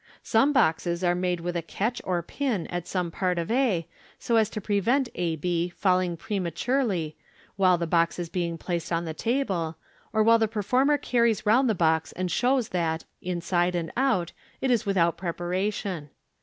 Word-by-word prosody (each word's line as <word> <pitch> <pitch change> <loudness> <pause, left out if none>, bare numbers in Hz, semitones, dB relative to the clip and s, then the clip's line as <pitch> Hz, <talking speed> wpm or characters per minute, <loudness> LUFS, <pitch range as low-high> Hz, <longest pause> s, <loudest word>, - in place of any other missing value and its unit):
Some 230 +6 +3
boxes 170 - +1
are 175 -1 +3
made 180 -1 -1
with 175 +1 -3
a 170 - 0
catch 215 +8 -2
or 175 -2 -1
pin 225 - -2
at 175 -1 -4
some 180 -3 -2
part 180 0 -1
of 170 +4 -2
a, 225 -10 +1 0.3
so 235 - -1
as 220 -1 +3
to 215 - -5
prevent 225 +6 +1
a 170 -2 -1
b 175 +2 -1
falling 180 -1 +1
prematurely 190 - -1 0.4
while 185 -2 +4
the 170 - -2
box 170 0 +2
is 175 -1 -3
being 170 -1 -2
placed 170 -1 -3
on 170 0 0
the 160 - -4
table, 185 - -1 0.3
of 215 -1 +2
while 230 0 +6
the 220 - +2
performer 250 +7 +2
carries 235 -5 +1
round 240 +5 +4
the 220 - +2
box, 160 -2 +1
and 180 -1 -3
show? 260 +2 +3
that, 165 -5 -2 0.2
inside 175 0 0
and 165 -2 -2
out, 240 -10 +1 0.3
it 265 - 0
is 230 -4 +1
without 170 -4 +2
preparation. 180 -1 -3
180 Hz, 180 wpm, -26 LUFS, 170-225 Hz, 0.4 s, while